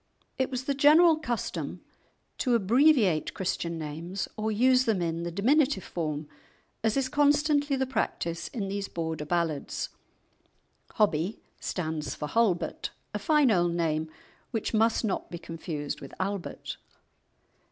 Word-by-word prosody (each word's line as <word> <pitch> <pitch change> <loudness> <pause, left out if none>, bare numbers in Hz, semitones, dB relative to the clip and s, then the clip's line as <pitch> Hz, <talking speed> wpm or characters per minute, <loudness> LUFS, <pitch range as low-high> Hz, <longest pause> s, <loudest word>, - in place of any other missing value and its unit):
It 260 - +1
was 255 -1 -3
the 280 - 0
general 310 +4 +6
custom 245 -7 -3 0.6
to 250 -3 +2
abbreviate 230 - +3
Christian 170 -3 -2
names 160 +5 -4
or 220 0 -1
use 255 +4 +4
them 220 -5 +2
in 165 -1 -1
the 170 - -3
diminutive 255 - +2
form, 155 -3 -3 0.6
as 225 +3 +2
is 270 -1 +1
constantly 290 0 +3
the 265 0 0
practice 170 -9 -2
in 210 -6 -4
these 200 0 -3
Border 160 -2 -3
ballads. 165 -3 -1 1.0
"Hobbie" 195 -2 +1 0.2
stands 155 -4 -3
for 150 - -4
"Halbert," 220 -7 +1 0.2
a - - -2
fine 300 -6 +4
old 175 -3 +2
name 160 -2 0 0.4
which 225 0 -2
must 225 +1 +3
not 200 - -2
be 170 - -5
confused 160 -3 -5
with 135 - -10
"Albert." 195 -1 -4
200 Hz, 135 wpm, -28 LUFS, 165-260 Hz, 1.0 s, general